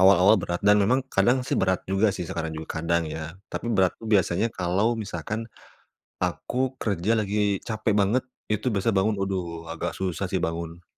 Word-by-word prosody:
Awal-awal 95 +2 +7
berat, 85 0 -3
dan 105 0 +6
memang 120 +7 +3
kadang 120 +6 +3
sih - - -4
berat 95 -1 +1
juga 95 +3 +2
sih 90 - -3
sekarang 80 -1 -4
juga, 80 0 -5
kadang, 85 +1 +1
ya. 80 +2 -6 0.2
Tapi - - -4
berat 95 -6 +3
itu 115 - -8
biasanya 95 +3 +2
kalau 100 +4 0
misalkan 105 0 -4 0.8
aku 130 +1 -1
kerja 100 -1 0
lagi 100 -1 0
capek 110 -1 -1
banget, 110 +6 +2 0.3
itu 105 +2 -1
biasa 100 +3 +1
bangun, 105 +3 +2
aduh, 85 -4 -3
agak 85 +1 -3
susah 95 0 -2
sih 95 - 0
bangun. 85 +1 -4
95 Hz, 175 wpm, -26 LUFS, 85-110 Hz, 0.8 s, Awal-awal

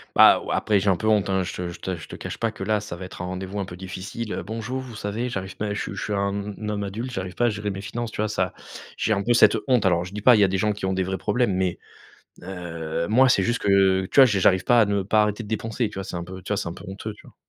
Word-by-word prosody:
Bah, - - +8
ouais, - - -10
après 105 -2 +2
j'ai 100 +1 +1
un 95 - +4
peu 110 - -3
honte 105 -2 +3
hein 95 -1 +1
je - - -4
te 90 - -4
je - - -10
te 95 -1 -3
je 80 - -10
te - - -8
cache - - -6
pas 115 - 0
que 110 - -7
là 105 +1 +1
ça 105 -4 -7
va 90 - -8
être 90 - -8
un - - -3
rendez-vous 95 +2 -5
un 100 - -2
peu 90 - -9
difficile: 95 +4 -6
«Bonjour, 115 +4 -4
vous 130 -3 -8
savez, 110 +3 -3
j'arrive 95 -5 -5
pa 105 -1 -2
je 105 - -3
suis - - -5
je 100 - -5
suis 105 - -2
un 100 +1 -2
un 105 -1 -5
homme 105 -1 -2
adulte, 115 +6 -5
j'arrive 95 -4 -5
pas 120 - +2
à - - +3
gérer 105 -1 -3
mes 95 -1 -5
finances». 115 +2 -4
Tu - - -2
vois? 110 - 0
Ça 95 -3 -1 0.4
j'ai - - -1
un 100 -2 +2
cette 110 -2 +6
honte, 125 -6 +3
alors 85 -2 +2
je 90 - -10
dis 105 - -5
pas 125 +3 +7
il - - +3
y 100 - +6
a - - +2
des 95 +1 -1
gens 105 +3 +1
qui 105 -2 -4
ont 95 - 0
des 95 0 0
vrais 95 +1 -2
problèmes 120 -2 +1
mais 90 -2 -1 0.6
heu, 85 -3 -4
moi 130 +5 +5
c'est 115 -6 +4
juste 120 +5 0
que, 95 -1 +3
tu - - -8
vois, 135 - +11
j'ai 105 -6 +2
j'arrive 95 0 +4
pas 120 -1 +5
à - - +6
ne 100 -1 0
pas 105 +3 +3
arrêter 105 +2 -2
de 105 - -10
dépenser, 110 +1 -2
tu 105 - -12
vois, 95 - -4
c'est 90 - -6
un 85 - -4
peu. 95 +1 -9
Tu 90 - -12
vois? - - +1
C'est 90 - -2
un - - -5
peu 90 - -12
honteux. 105 +3 -6
Tu 105 - -17
vois? - - -17
100 Hz, 330 wpm, -24 LUFS, 95-110 Hz, 0.6 s, vois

